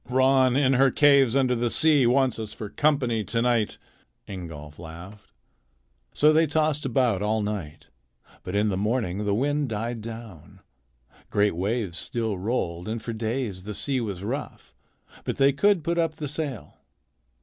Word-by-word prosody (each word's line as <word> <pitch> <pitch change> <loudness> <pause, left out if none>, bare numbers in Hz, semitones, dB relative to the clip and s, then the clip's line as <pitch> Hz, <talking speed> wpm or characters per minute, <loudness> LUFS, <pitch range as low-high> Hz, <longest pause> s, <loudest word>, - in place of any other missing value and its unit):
"Ran, 130 0 +4
in 135 -1 +3
her 135 +1 +5
caves 140 -3 +4
under 125 -3 +2
sea, 145 -2 +4
wants 130 -1 +2
us 110 -1 -5
for 105 - -6
company 130 -7 +1
to 115 +5 -1
night," 115 -3 +1 0.5
Ingolf 80 -6 -8
laughed. 85 +5 -11 0.8
So 150 +1 +4
they 160 +1 +4
tossed 150 -1 0
about 120 -6 +1
all 105 +1 0
night, 90 -8 -5 0.6
but 90 - -6
in 105 +1 +2
the 95 - -1
morning 105 -2 -1
the 100 -1 +1
wind 145 +3 0
died 115 +1 -3
down. 110 -7 -10 0.7
Great 105 -3 +2
waves 95 -1 -2
still 110 -5 -3
rolled, 90 -5 -2
and 110 +1 -3
for 115 +1 -5
days 110 -4 -3
the 105 +1 -6
sea 135 +2 -1
was 100 -5 -5
rough, 135 +8 -6 0.5
but - - -3
they 135 0 +4
could 195 +3 +2
put 170 +2 0
up 165 -2 0
the 150 - -5
sail. 140 - -5
115 Hz, 160 wpm, -25 LUFS, 105-135 Hz, 0.8 s, her